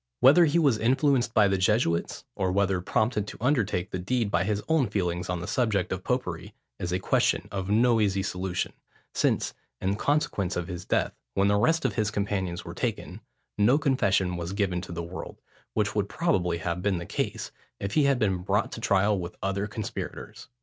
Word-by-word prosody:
Whether 160 +7 +7
he 155 +2 +2
was 140 -9 +3
influenced 130 +1 +2
by 105 -2 +6
the 95 -1 +1
Jesuits, 95 -4 +1
or 95 -1 -1
whether 95 -1 +1
prompted 110 +1 0
to - - -8
undertake 110 -9 0
the 90 - -3
deed 110 +3 -1
by 95 - +2
his 105 0 -1
own 160 -6 +3
feelings 90 -3 -2
on 90 -2 -2
the 90 - -5
subject 105 -5 0
of 95 0 -3
popery, 125 -10 -3 0.2
is 90 - -3
a 90 - +1
question 95 - +1
of 95 -1 -3
no 115 +2 +4
easy 100 -2 +1
solution, 90 -1 -2 0.4
since, - - +1 0.3
in 95 +2 0
consequence 110 - 0
of 90 -1 -2
his 90 -1 -6
death, - - 0 0.2
when 100 +1 +3
the 105 - +3
rest 160 +10 +2
of - - +1
his 110 -3 0
companions 100 -4 -2
were - - -6
taken, - - -4 0.4
no 120 +7 +5
confession 100 - +1
was 85 +2 -4
given 95 -3 0
to 90 - -9
the 85 0 -4
world, 85 +2 -8 0.4
which 105 -2 +1
would 100 -2 -1
probably 90 - 0
have 85 +1 -3
been 100 -1 +1
the 85 - -5
case, - - -3 0.3
if 100 +1 -4
he 150 +1 +4
had 140 -2 +3
been 100 -5 +1
brought 90 - 0
to - - -7
trial 100 +1 +2
with 85 0 -5
the - - -30
other 100 +1 -1
conspirators. 105 0 -6
100 Hz, 200 wpm, -27 LUFS, 90-115 Hz, 0.4 s, Whether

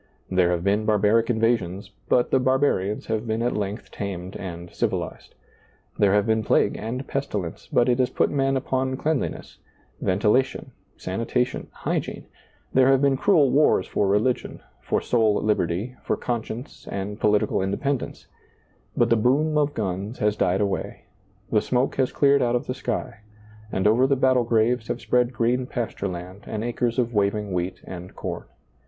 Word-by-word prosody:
There 90 -2 +3
have 85 -1 0
been 100 +2 +2
barbaric 110 +2 +3
invasions, 110 -5 0 0.2
but 125 - +3
the 135 - +4
barbarians 130 -6 +1
have 110 +1 -2
been 110 +1 -1
at 120 - 0
length 105 +1 -4
tamed 95 -2 -5
and 85 -2 -7
civilized. - - -3 0.6
There 100 -1 +4
have 105 -1 +3
been 110 0 +1
plague - - +2
and 125 +5 -5
pestilence, 105 -11 -4
but 120 - +3
it 125 0 +2
has 125 - +3
put - - +1
men 135 -1 +1
upon 130 0 -1
cleanliness, 155 -1 -2 0.4
ventilation, 105 +8 +1 0.3
sanitation, 115 +6 -2
hygiene; - - -3 0.5
there 130 0 +5
have 135 0 +5
been 140 -1 +3
cruel 145 -3 +4
wars 140 -8 +4
for 100 - 0
religion, 105 +6 0 0.2
for - - 0
soul 110 -3 +2
liberty, 105 +3 0
for - - -1
conscience 120 +2 -5
and 100 +2 -4
political 105 -2 +2
independence; 120 +8 -2 0.7
but - - +3
the - - +6
boom 140 +8 +2
of 145 -1 +1
guns 100 +2 -3
has 105 0 +1
died 95 -1 +1
away, 100 -1 -3 0.5
the 105 - +3
smoke 125 +2 0
has 130 -1 +1
cleared 140 -1 +4
out 120 -1 +2
of 120 - -1
the - - -3
sky, 100 - -4 0.5
and 95 - -1
over 115 +5 +4
the 140 - +3
battle 130 -2 +3
graves 115 0 +1
have - - -2
spread 125 0 +1
green 125 +2 0
pasture 115 -5 -3
land 90 +2 -7
and 110 0 -3
acres 120 0 -1
of 120 -2 0
waving 105 -1 0
wheat 90 +1 -2
and 90 0 -9
corn. - - -5
115 Hz, 165 wpm, -24 LUFS, 100-130 Hz, 0.7 s, the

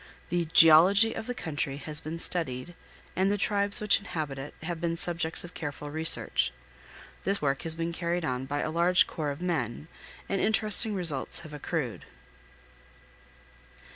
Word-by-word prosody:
The 175 -1 -3
geology 175 +8 +4
of 220 - -9
the 245 - -6
country 145 -7 -5
has 150 +1 -4
been 160 +2 -8
studied, 165 -3 -6 0.4
and 190 +2 -1
the 205 - -2
tribes 200 0 +2
which 210 -1 +1
inhabit 155 -9 -7
it 135 +2 -11
have 170 0 -7
been 170 -1 -4
subjects 165 -2 0
of 175 0 -13
careful 145 -1 -9
research. 160 +2 +7 0.7
This 195 +2 +5
work 140 -2 -3
has 165 -2 +5
been 165 +1 -6
carried 170 0 -5
on 130 -1 -5
by 145 +1 -5
a 155 - -5
large 175 +2 +1
corps 155 -3 -7
of 145 +5 -8
men, 150 -5 -5 0.4
and 195 - -4
interesting 215 0 +1
results 165 -8 +2
have 155 -3 -14
accrued. 150 -5 -6
165 Hz, 160 wpm, -25 LUFS, 150-180 Hz, 0.7 s, research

